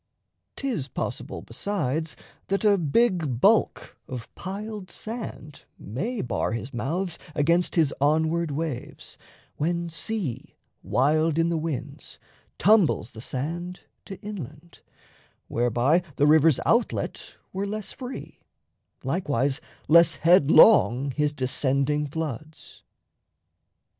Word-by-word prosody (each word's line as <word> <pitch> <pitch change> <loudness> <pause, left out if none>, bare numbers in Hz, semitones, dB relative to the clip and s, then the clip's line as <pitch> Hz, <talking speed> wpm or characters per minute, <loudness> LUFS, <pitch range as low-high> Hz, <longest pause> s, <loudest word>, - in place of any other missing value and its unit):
'Tis 240 - -2
possible, - - -5
besides, 160 - -2 0.3
That 195 +2 0
a 200 -2 +5
big 165 - +1
bulk 215 - +2
of 120 -3 -8
piled 200 0 -6
sand 215 - -7
may 200 - -4
bar 110 -2 -1
His 120 +3 -5
mouths 165 +9 -2 0.2
against 170 +4 +2
his 155 -5 +3
onward 160 +3 +2
waves, 145 -3 -5 0.4
when 170 +2 -1
sea, 165 - -4 0.3
Wild 155 +4 +2
in 165 0 +2
the 170 - 0
winds, 155 -5 -5 0.4
tumbles 195 - +3
the 110 - -10
sand 170 +9 -4 0.2
to 195 - -8
inland; 170 - -9 0.7
Whereby 120 +8 +2
the 145 - +3
river's 155 -1 +5
outlet 235 +1 0 0.2
were 195 +2 -2
less 215 0 -5
free, 255 0 -8 0.6
Likewise 140 -1 0 0.3
less 170 +2 +6
headlong 155 - +5
his 150 +2 0
descending 140 +2 0
floods. 155 0 -6
160 Hz, 105 wpm, -25 LUFS, 140-185 Hz, 0.7 s, less